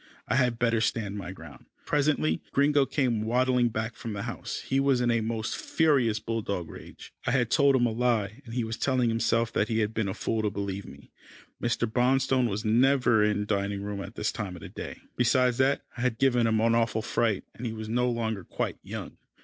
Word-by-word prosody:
I - - 0
had 125 -3 +2
better 115 -1 +2
stand 105 -3 -1
my 90 -2 -6
ground. 80 -6 -12 0.2
Presently 140 - +1
Gringo 140 0 +3
came 125 -7 0
waddling 125 +2 +2
back 110 +1 -3
from 115 - -6
the 100 -1 -4
house. - - -5
He 135 - 0
was 135 -2 +3
in 120 -1 +2
a 115 -1 +2
most 110 0 -2
furious 135 -9 +2
bulldog 105 -7 -3
rage. - - -12
I - - +3
had 125 -4 +1
told 140 -3 +5
him 120 -2 +3
a 120 - +1
lie, 115 -1 0
and 115 -2 -9
he 125 - 0
was 110 0 -4
telling 130 -3 +2
himself 115 0 +1
that 105 - +1
he 110 - -1
had 110 -1 0
been 110 -2 -1
a 95 - -3
fool 110 - -1
to 105 - +1
believe 100 -1 -4
me. - - -14 0.5
Mr. 120 0 +1
Bonstone 130 +1 +2
was 105 +2 -3
never 120 0 +4
in 105 0 +1
the - - -2
dining 100 -1 -1
room 100 -1 -4
at 100 +3 -8
this 105 - -1
time 100 -5 -5
of 85 - -10
day. - - -7 0.2
Beside 125 +1 +3
that, 135 +1 +2
I 120 - -6
had 125 -2 0
given 125 -3 +3
him 110 -1 +2
an 115 0 +3
awful 115 -1 +1
fright, 110 -4 0
and 125 - -5
he - - -3
was 110 -1 -6
no 125 +3 +1
longer 110 -4 -2
quite - - -3
young. - - -7
115 Hz, 220 wpm, -28 LUFS, 105-125 Hz, 0.5 s, told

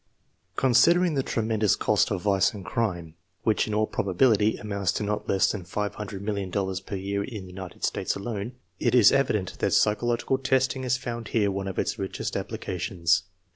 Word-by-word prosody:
Considering 170 +7 +4
the 135 - +1
tremendous 110 -4 +1
cost 105 0 +2
of 95 -4 -2
vice 100 0 +2
and 100 -3 -8
crime, 85 -8 -2 0.3
which 110 -1 +2
in 110 - -3
all 110 0 +3
probability 105 +2 +2
amounts 100 -3 -1
to - - -3
not 105 0 -3
less 95 - +3
than 100 -4 -5
$500,000,000 100 -1 -3
per 100 - -4
year 100 +1 -2
in 105 -4 -7
the 90 - -11
United 95 -1 -9
States - - -1
alone, 105 +2 -4 0.3
it 120 0 +2
is 120 -5 +7
evident 110 -9 0
that - - +1
psy 105 - +4
chological 120 +4 -1
testing 130 0 +1
has 130 0 +1
found 120 -3 -5
here 105 -3 +1
one 95 0 -3
of 95 - -5
its 115 - -1
richest 95 -1 -4
applica 90 - -4
tions. 85 0 +1
105 Hz, 180 wpm, -26 LUFS, 95-115 Hz, 0.3 s, is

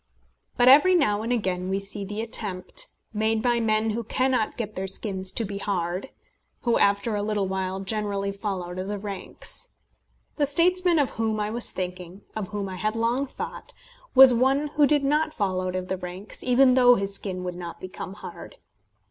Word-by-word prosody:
But 245 +1 +4
every 300 +8 +7
now 210 -11 +2
and 230 +2 -3
again 185 -6 -1
we 195 +1 0
see 200 +1 -2
the 205 +2 -4
attempt 220 - -2 0.3
made 220 +1 +1
by 240 -1 +2
men 220 -1 +1
who 230 +2 -3
cannot 255 0 0
get 215 -3 -4
their 190 +1 -4
skins 190 -1 -2
to 230 - 0
be 200 0 -5
hard 185 +3 -2 0.5
who 235 -1 +2
after 200 +2 +2
a 205 - -1
little 205 -2 -1
while 190 0 -2
generally 200 -1 -2
fall 200 -2 -3
out 175 +1 -7
of 185 - -4
the 205 0 -3
ranks. 200 -1 -5 0.7
The 290 -2 +2
statesman 355 +3 +3
of 285 -4 +2
whom 220 -1 -1
I 210 0 -1
was 240 +1 -1
thinking 180 0 -6
of 215 -3 -3
whom 205 -1 -4
I 185 -1 -6
had 215 +4 -1
long 235 +5 0
thought - - -7 0.4
was 260 -1 +10
one 270 +5 +2
who 295 0 +3
did 295 -1 +2
not 300 +2 +1
fall 190 -3 0
out 185 0 -3
of 185 0 -3
the 190 - -2
ranks, 180 +3 -7
even 255 +1 +5
though 245 -1 +6
his 195 -2 -2
skin 185 -2 -3
would 180 0 -3
not 175 -1 -7
become 185 0 -7
hard. 355 - -10
210 Hz, 195 wpm, -25 LUFS, 190-245 Hz, 0.7 s, was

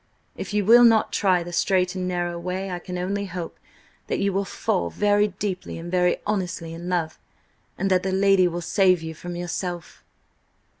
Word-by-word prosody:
"If - - -6
you 205 -1 0
will 240 +3 +8
not 225 -2 +4
try 185 -3 +2
the 175 0 -8
straight 185 0 +1
and 185 -1 -3
narrow 175 -1 -2
way, 185 +2 -4
I 180 - -3
can 180 0 -6
only 200 +3 -2
hope 175 -3 -7 0.5
that - - -1
you 200 -1 0
will 195 +1 0
fall 85 - -1
very 205 - +2
deeply 195 -1 -5
and 170 +1 -7
very 180 -1 +2
honestly 180 -5 -3
in 170 +2 -7
love; 170 -3 -2 0.6
and 195 +1 -1
that 185 -1 +4
the 190 - -2
lady 195 -1 +4
will 175 0 -3
save 185 -1 +2
you 160 0 -5
from 175 +2 -7
yourself." 175 0 -5
180 Hz, 190 wpm, -24 LUFS, 175-195 Hz, 0.6 s, will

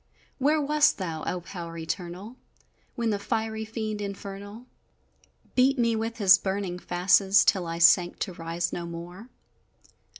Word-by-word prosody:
Where 295 +3 +3
wast 300 +1 +3
thou, 165 -5 -4
O 180 - -2
Power 170 -2 -8
Eternal! 180 +6 -6 0.6
When 230 -2 0
the 205 - -1
fiery 220 +1 -2
fiend, 215 -1 -4
infernal, 200 +3 -7 0.9
Beat 265 +2 +3
me 230 -2 +2
with 225 +1 -3
his 200 -4 +6
burning 190 -2 -3
fasces, 190 +3 +3
Till 185 -5 +2
I 165 0 -4
sank 175 +1 +5
to 190 - -2
rise 170 +1 -3
no 170 -1 -4
more? 175 +7 -9
200 Hz, 140 wpm, -26 LUFS, 175-225 Hz, 0.9 s, his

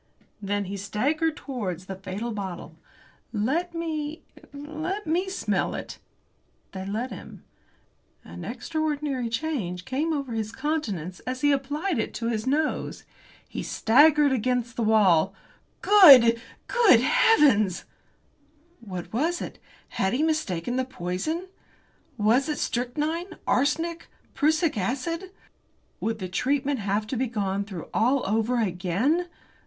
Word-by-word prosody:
Then 205 0 -1
he 200 +2 -5
staggered 290 - 0
towards 190 - -5
that 190 0 -8
fatal 205 +6 -4
bottle. 190 -5 -6 0.6
"Let 295 +12 -1
me 315 -2 -4 0.3
let 310 +8 -5
me 350 +4 0
smell 380 - -1
it." - - -7 0.7
They 190 0 -6
let 225 +5 -3
him. 195 - -10 0.8
An 85 +1 -9
extraordinary 285 -1 -2
change 225 - -3
came 290 +5 -1
over 280 -5 -2
his 220 -1 -2
countenance 210 - -3
as 255 0 -3
he 290 - +4
applied 290 +4 -1
it - - -3
to 230 0 -2
his 220 0 -2
nose. 300 +3 -1 0.4
He - - -5
staggered 290 +4 +4
against 245 -1 0
the 235 - -2
wall. 195 -5 +4 0.5
"Good 270 - +8 0.2
good 445 - +5
heavens!" 260 - +4 0.9
What 185 -6 -7
was 325 +9 0
it? - - -7 0.3
Had 190 0 -1
he 275 +5 +1
mistaken 245 - -1
the 260 - +1
poison? 255 - -3 0.7
Was 235 +7 +3
it 300 - -1
strychnine, 305 +9 -2
arsenic, 320 +6 0 0.3
prussic 310 -3 +1
acid? 330 - -2 0.7
Would 225 0 -2
the 185 -3 -5
treatment 270 +8 0
have 205 +1 -1
to 225 - -4
be 255 +2 0
gone 200 -3 -1
through 190 -5 -7
all 255 +4 +2
over 225 +4 +1
again? 215 - 0
255 Hz, 125 wpm, -26 LUFS, 205-310 Hz, 0.9 s, Good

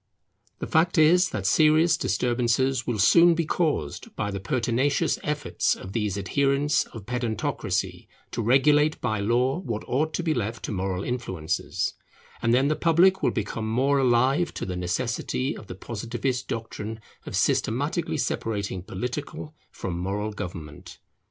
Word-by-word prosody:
The - - -4
fact 170 +3 +2
is 175 +4 +5
that 100 -3 -4
serious 155 - +4
disturbances 125 +1 0
will 120 -3 -1
soon 170 - +6
be 165 0 0
caused 150 - -2
by 105 -1 -2
the 100 - -4
pertinacious 130 - 0
efforts 150 0 0
of 95 - -9
these 105 -3 -1
adherents 140 +6 +1
of 110 -4 -11
pedantocracy 120 -2 -2 0.2
to 120 - -2
regulate 150 +6 +4
by 110 -3 -1
law 125 - +1
what 115 - -4
ought 155 +5 0
to 175 - -2
be 160 -2 +1
left 115 -2 -3
to - - -4
moral 95 -1 -2
influences; 95 -10 -2 0.5
and 115 - +2
then 130 +3 +4
the 155 - +1
public 175 +4 +4
will - - +3
become 110 0 -3
more 135 +5 +2
alive 130 +6 +2
to - - -4
the 90 - -4
necessity 115 +8 -2
of 105 - -11
the 90 - -7
Positivist 120 +5 -3
doctrine 110 -1 -5 0.3
of - - -4
systematically - - 0
separating 100 -4 -2
political 125 - -5 0.2
from 85 -2 -5
moral 100 +4 -2
government. 85 -7 -8
120 Hz, 150 wpm, -26 LUFS, 105-145 Hz, 0.5 s, soon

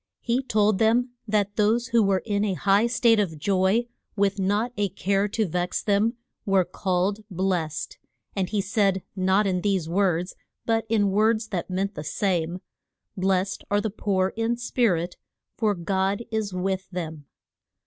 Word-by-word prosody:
He 240 +2 0
told 215 -5 +2
them 240 +3 +3 0.2
that 205 -1 0
those 225 +3 +2
who 230 0 +4
were 195 -3 +2
in 205 -2 0
a 200 -3 0
high 200 +5 +3
state 235 -2 +3
of 175 -6 -1
joy, 190 +7 +2 0.3
with 200 0 +1
not 205 +6 0
a 205 -1 0
care 195 +2 0
to 220 +1 0
vex 180 +2 -2
them, 210 +3 +2 0.3
were 195 -4 +3
called 190 +3 -1
blest. 175 -4 -2 0.4
And 190 -3 -1
he 210 -2 0
said, 195 -2 +1
not 190 +2 +2
in 185 -2 0
these 190 -5 0
words, 180 0 0 0.3
but 225 -1 +1
in 205 -3 +2
words 220 +2 +2
that 185 -3 -3
meant 195 +2 -1
the 150 - -6
same: 175 +1 -1 0.5
Blest 190 0 0
are 205 - +2
the 220 0 -2
poor 190 -2 0
in 230 +1 0
spirit, 205 -8 0 0.4
for 215 -3 +1
God 190 +4 -1
is 220 -2 -1
with 190 +1 -2
them. 160 -5 -6
200 Hz, 160 wpm, -25 LUFS, 185-215 Hz, 0.5 s, who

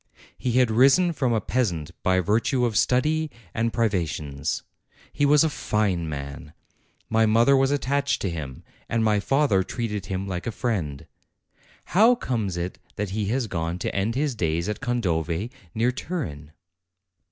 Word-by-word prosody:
He 125 - -2
had 125 -2 +4
risen 140 +10 +5
from 130 -5 0
a 115 - +2
peasant 95 -9 -1
by 95 0 +2
virtue 115 +6 +1
of 115 -3 -1
study 155 +7 +2 0.2
and 115 0 0
privations. 80 - -1 0.5
He 145 - +2
was 150 +1 +6
a - - +3
fine 100 - -1
man. 70 +1 -7 0.5
My 110 0 +3
mother 115 +5 +5
was 135 0 +3
attached 140 0 0
to 100 - 0
him, 75 -6 -6 0.3
and 115 -1 +1
my 105 -1 +3
father 135 -4 +2
treated 105 -2 -4
him 95 +1 -3
like 90 +1 -4
a - - 0
friend. 80 - -2 0.8
How 225 +7 +5
comes 110 - -2
it 90 +1 -4 0.2
that 105 -2 -3
he 105 +1 -1
has 125 +4 0
gone 85 -3 -3
to 90 - -3
end 100 +4 0
his 145 0 0
days 85 -4 -1
at 105 - -3
Condove, 95 -6 -1 0.3
near 115 +3 +2
Turin? 80 - -5
110 Hz, 160 wpm, -25 LUFS, 90-130 Hz, 0.8 s, was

